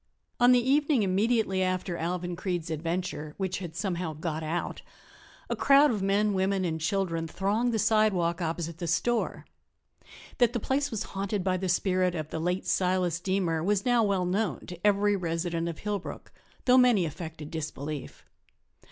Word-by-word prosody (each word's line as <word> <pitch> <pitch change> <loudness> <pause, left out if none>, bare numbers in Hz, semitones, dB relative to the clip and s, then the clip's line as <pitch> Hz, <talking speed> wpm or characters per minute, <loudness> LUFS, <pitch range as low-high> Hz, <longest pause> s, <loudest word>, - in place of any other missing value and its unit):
On 245 0 +6
the 245 0 +4
evening 285 -3 +3
immediately 200 0 +1
after 185 -1 -1
Alvan 175 +1 -3
Creede's 175 -2 -3
adventure 160 -1 -3
(which 190 -1 -2
had 170 -4 -7
somehow 180 -3 -2
"got 155 0 -4
out") 160 +2 -3 0.7
a - - -1
crowd 280 +1 +5
of 210 -4 -2
men, 200 +2 +2
women 190 0 +1
and 160 -2 -2
children 165 -1 -1
thronged 205 +8 0
the 225 - 0
sidewalk 210 -6 +2
opposite 165 0 -3
the 170 - -3
store. 235 +8 0 0.9
That 240 -2 +4
the 240 - 0
place 280 +5 0
was 220 -6 -3
haunted 195 0 -2
by 185 -1 +1
the 185 0 -2
spirit 185 0 +1
of 155 -2 -5
the 160 - -3
late 180 +3 -1
Silas 180 -2 +1
Deemer 180 -4 0
was 200 +1 +1
now 245 -2 +4
well 195 -3 +1
known 195 +3 -1
to 175 -1 -9
every 205 0 +3
resident 170 -1 -2
of 165 - -6
Hillbrook, 205 -2 -5 0.3
though 255 0 +6
many 240 -8 +4
affected 160 -1 -7
disbelief. 150 -3 -6
185 Hz, 165 wpm, -28 LUFS, 170-205 Hz, 0.9 s, On